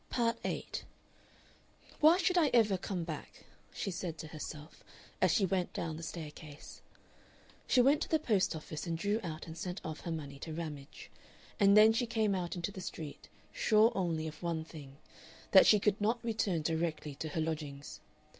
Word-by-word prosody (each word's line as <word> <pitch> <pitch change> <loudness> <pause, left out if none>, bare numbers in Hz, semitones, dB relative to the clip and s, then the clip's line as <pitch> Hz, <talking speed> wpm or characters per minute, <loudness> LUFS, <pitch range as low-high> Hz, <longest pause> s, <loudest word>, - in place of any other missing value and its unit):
Part 235 -1 0
8 - - -3 1.2
"Why 315 +3 +7
should 365 0 +1
I 340 -4 +5
ever 215 -4 +5
come 185 -1 -3
back?" 160 -3 -8 0.3
she 195 - -3
said 175 -2 -4
to 155 - -7
herself, 155 0 -8 0.4
as - - +5
she 205 - +3
went 185 -1 -1
down 165 -2 -3
the 160 - -7
staircase. 155 -2 -9 0.9
She 255 - +5
went 280 +4 +4
to - - -2
the 320 - +4
post 210 - +1
office 155 +1 -6
and 165 -1 -1
drew 205 +6 0
out 165 -4 -6
and 160 - -8
sent 180 +2 -5
off 155 -1 -5
her 170 - -5
money 140 -4 -6
to 160 +2 -6
Ramage. 150 -3 -7 0.5
And 200 0 +6
then 215 +1 +8
she 240 +1 0
came 220 -3 +1
out 180 -2 -2
into 175 +2 -3
the 190 - -8
street, 155 -5 -7 0.2
sure 220 +2 +4
only 165 -4 -1
of 155 0 -9
one 170 -2 -2
thing 140 -4 -11 0.5
that 190 - +8
she 210 - +7
could 205 +1 +1
not 225 +4 +2
return 200 -8 0
directly 160 -2 -2
to 155 - -5
her 155 - -3
lodgings. 150 -3 -4
170 Hz, 185 wpm, -33 LUFS, 155-210 Hz, 1.2 s, then